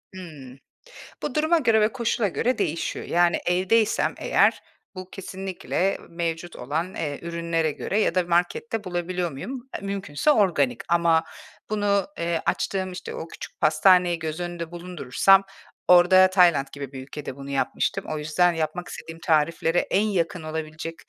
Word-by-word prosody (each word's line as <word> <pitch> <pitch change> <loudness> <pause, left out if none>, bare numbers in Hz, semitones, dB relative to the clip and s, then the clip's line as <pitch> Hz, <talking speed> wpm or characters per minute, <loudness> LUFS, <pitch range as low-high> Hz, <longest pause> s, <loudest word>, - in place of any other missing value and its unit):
Hımm. 140 -8 -10 0.6
Bu, 275 - -3
duruma 315 +3 +3
göre 225 -5 +3
ve 215 - +3
koşula 235 -3 0
göre 245 +7 0
değişiyor. 165 +2 -2
Yani, 175 0 +2
evdeysem 190 +5 +2
eğer - - +2 0.3
bu 185 0 -8
kesinlikle 190 0 -3
mevcut 170 0 -4
olan, 160 +8 -3
eee, 145 -3 -3
ürünlere 170 -1 -1
göre 200 +8 -2
ya 185 - +1
da 185 - +3
markette 175 +6 -1
bulabiliyor 175 -1 -2
muyum? 250 - -7
E, - - -17
mümkünse 195 - 0
organik. 145 - +2
Ama 170 -1 +3 0.5
bunu, 205 -2 +1
ııı, 170 -1 0
açtığım, 190 -1 -1
işte, 180 - -7
o 165 - -6
küçük - - -10
pastaneyi 175 +2 +4
göz 160 +1 -4
önünde 175 -1 -5
bulundurursam 175 +2 +2 0.4
orada 185 +1 +7
Tayland 175 -7 +4
gibi 140 -2 -7
bir 135 -2 -7
ülkede 135 0 -7
bunu 140 0 -9
yapmıştım. 140 - -1
O 155 - -2
yüzden 165 +4 +2
yapmak 165 +2 -3
istediğim 165 0 -9
tariflere 165 +2 +1
en 195 - +1
yakın 180 -5 -1
olabilecek 155 +1 -5
175 Hz, 150 wpm, -24 LUFS, 160-190 Hz, 0.6 s, orada